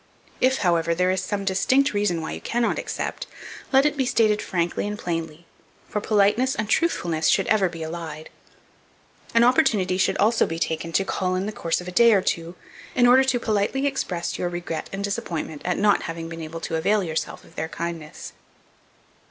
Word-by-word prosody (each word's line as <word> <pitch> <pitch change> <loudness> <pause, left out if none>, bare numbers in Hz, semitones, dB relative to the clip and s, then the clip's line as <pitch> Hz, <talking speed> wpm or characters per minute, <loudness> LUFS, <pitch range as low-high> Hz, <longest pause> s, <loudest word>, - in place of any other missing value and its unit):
If, 260 +1 +3
however, 170 -1 +2
there 180 +1 +2
is 185 -1 0
some 200 0 -3
distinct 255 +9 +2
reason 205 -5 0
why 160 - -5
you - - -6
cannot 235 0 0
accept, - - -4 0.4
let 270 +1 +5
it 300 - +2
be 265 -3 0
stated 215 -3 +2
frankly 175 +2 -1
and 210 0 -4
plainly, 165 -3 -4 0.4
for 210 - -3
politeness 215 +6 +2
and 215 - -2
truthfulness 175 - +1
should - - +3
be - - -3
ever 200 -4 +3
allied. 160 -1 -7 1.0
An 230 - +6
opportunity 225 - +3
should, - - +2
also, 220 +3 +3
be 165 - -4
taken 165 0 -2
to 195 - +2
call 185 -1 -1
in 185 +1 -1
the 210 - -3
course 165 -4 -2
of 180 - -10
a - - -4
day 235 +5 +6
or 195 - +4
two, 170 +1 -2 0.4
in 245 - +4
order 255 +2 +7
to 255 -2 +1
politely 220 +5 0
express 180 -11 -2
your 175 - -1
regret 175 -2 -5
and 195 +1 -4
disappointment 165 -6 -4
at 180 0 0
not 205 0 +3
having 165 0 -5
been 165 0 -7
able 160 +1 -7
to 165 - -2
avail 200 +5 +2
yourself 160 -2 -4
of - - -19
their 160 +1 -3
kindness. 165 -2 -6
185 Hz, 195 wpm, -24 LUFS, 165-220 Hz, 1.0 s, order